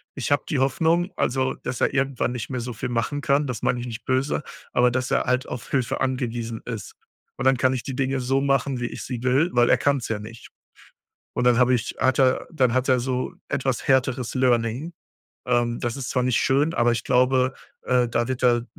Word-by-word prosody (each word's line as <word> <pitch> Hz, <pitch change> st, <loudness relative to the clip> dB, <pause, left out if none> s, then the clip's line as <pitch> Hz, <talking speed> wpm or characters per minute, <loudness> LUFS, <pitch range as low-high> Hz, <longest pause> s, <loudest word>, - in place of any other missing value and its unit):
Ich 135 Hz, 0 st, -3 dB
habe 145 Hz, -, +3 dB
die 140 Hz, -, 0 dB
Hoffnung, 165 Hz, +7 st, +1 dB
also, 130 Hz, +1 st, 0 dB
dass 125 Hz, -, -6 dB
er -, -, +2 dB
irgendwann 135 Hz, -3 st, 0 dB
nicht 115 Hz, -3 st, -5 dB
mehr 125 Hz, -2 st, -3 dB
so 120 Hz, 0 st, -5 dB
viel 110 Hz, -, -4 dB
machen 120 Hz, +5 st, -1 dB
kann. 140 Hz, +1 st, +2 dB
Das 125 Hz, -, -4 dB
meine 125 Hz, -, +1 dB
ich 120 Hz, -, -5 dB
nicht 115 Hz, -2 st, -7 dB
böse, 130 Hz, +3 st, 0 dB, 0.3 s
aber 125 Hz, 0 st, +4 dB
dass 130 Hz, 0 st, -2 dB
er -, -, +2 dB
halt 125 Hz, 0 st, 0 dB
auf 120 Hz, -, -7 dB
Hilfe 130 Hz, -4 st, -1 dB
angewiesen 120 Hz, -3 st, -2 dB
ist. 115 Hz, -4 st, -6 dB, 0.4 s
Und 125 Hz, -, -3 dB
dann 130 Hz, -1 st, +4 dB
kann 130 Hz, +1 st, +2 dB
ich 125 Hz, -, -3 dB
die 135 Hz, -2 st, -5 dB
Dinge 135 Hz, 0 st, -1 dB
so 135 Hz, +2 st, +1 dB
machen, 135 Hz, -2 st, +1 dB
wie 120 Hz, -, -2 dB
ich -, -, -7 dB
sie 120 Hz, -3 st, -5 dB
will, 135 Hz, +7 st, +3 dB
weil 120 Hz, 0 st, +4 dB
er 125 Hz, -, +5 dB
kann's 140 Hz, -2 st, 0 dB
ja 110 Hz, -2 st, -2 dB
nicht. 115 Hz, +2 st, -11 dB, 0.8 s
Und 125 Hz, -, -1 dB
dann 120 Hz, -1 st, +5 dB
habe 125 Hz, 0 st, +4 dB
ich 120 Hz, -2 st, -1 dB
hat 130 Hz, +1 st, +2 dB
er 130 Hz, -1 st, +3 dB
dann 130 Hz, -7 st, +2 dB
hat 130 Hz, 0 st, +1 dB
er 130 Hz, -1 st, +4 dB
so 130 Hz, 0 st, -2 dB
etwas 135 Hz, -2 st, -2 dB
härteres 130 Hz, -2 st, +1 dB
Learning. 125 Hz, +5 st, +1 dB, 0.5 s
Ähm, 120 Hz, -1 st, +1 dB
das 120 Hz, +2 st, -3 dB
ist 130 Hz, -, -4 dB
zwar 125 Hz, -1 st, 0 dB
nicht 125 Hz, -2 st, +2 dB
schön, 145 Hz, +5 st, +2 dB
aber 120 Hz, 0 st, +3 dB
ich 115 Hz, -1 st, -2 dB
glaube, 130 Hz, +1 st, +2 dB, 0.3 s
äh, 125 Hz, -1 st, +2 dB
da 120 Hz, +1 st, 0 dB
wird 130 Hz, -1 st, -3 dB
er 120 Hz, -1 st, +3 dB
125 Hz, 225 wpm, -24 LUFS, 120-135 Hz, 0.8 s, er